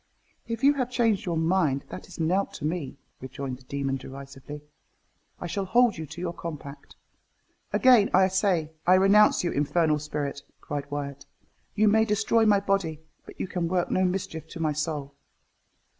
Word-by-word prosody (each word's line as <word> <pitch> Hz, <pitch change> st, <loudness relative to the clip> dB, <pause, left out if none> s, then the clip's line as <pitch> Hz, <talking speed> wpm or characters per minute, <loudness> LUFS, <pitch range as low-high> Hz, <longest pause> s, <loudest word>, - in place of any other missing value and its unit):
"If 230 Hz, +1 st, -4 dB
you 285 Hz, +1 st, +6 dB
have 255 Hz, -4 st, -2 dB
changed 225 Hz, -7 st, +1 dB
your 170 Hz, -2 st, 0 dB
mind, 160 Hz, -4 st, +1 dB
that -, -, -8 dB
is 180 Hz, -, -12 dB
nought 180 Hz, +5 st, 0 dB
to 150 Hz, -, -5 dB
me," 155 Hz, -4 st, -3 dB, 0.2 s
rejoined 130 Hz, 0 st, -6 dB
the -, -, -19 dB
demon 135 Hz, 0 st, -2 dB
derisively 140 Hz, +2 st, -10 dB, 0.8 s
"I -, -, -6 dB
shall 195 Hz, +3 st, -2 dB
hold 235 Hz, -1 st, +3 dB
you 160 Hz, -, -5 dB
to 160 Hz, +3 st, -10 dB
your 175 Hz, -1 st, -3 dB
compact." 150 Hz, -4 st, -8 dB, 0.8 s
"Again 245 Hz, -6 st, +5 dB
I 190 Hz, +1 st, +5 dB
say 185 Hz, -5 st, +1 dB, 0.2 s
I 180 Hz, -, +7 dB
renounce 195 Hz, +2 st, +5 dB
you, 175 Hz, -, 0 dB
infernal 150 Hz, +1 st, +1 dB
spirit!" 145 Hz, -1 st, -4 dB, 0.2 s
cried 145 Hz, -1 st, -5 dB
Wyat; 140 Hz, -1 st, -5 dB, 0.5 s
"you 215 Hz, +1 st, +3 dB
may 220 Hz, +1 st, +5 dB
destroy 220 Hz, +1 st, +2 dB
my 205 Hz, -1 st, +5 dB
body 195 Hz, -6 st, -1 dB, 0.3 s
but -, -, -13 dB
you -, -, -2 dB
can 180 Hz, -3 st, -2 dB
work 180 Hz, 0 st, 0 dB
no 185 Hz, -, +2 dB
mischief 180 Hz, -3 st, -2 dB
to 170 Hz, -, -9 dB
my 155 Hz, -2 st, 0 dB
soul." 150 Hz, -2 st, -3 dB
170 Hz, 175 wpm, -26 LUFS, 145-195 Hz, 0.8 s, I